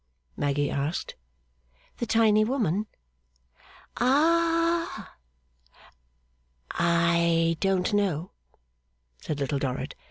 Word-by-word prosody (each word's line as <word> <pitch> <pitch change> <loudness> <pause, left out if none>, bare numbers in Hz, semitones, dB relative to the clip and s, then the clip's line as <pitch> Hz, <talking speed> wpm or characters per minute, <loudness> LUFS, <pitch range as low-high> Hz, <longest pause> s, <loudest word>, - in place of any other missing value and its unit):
Maggy 145 0 -1
asked. 145 +4 -3 0.8
'The 235 - -3
tiny 215 -1 +4
woman?' 215 - -1 1.1
'Ah!' 335 +5 +1 1.6
'I 170 -1 +2
don't 195 +1 0
know,' 190 -4 0 0.9
said 150 -2 -4
Little 140 0 -1
Dorrit. 130 +1 -3
185 Hz, 70 wpm, -26 LUFS, 155-235 Hz, 1.6 s, tiny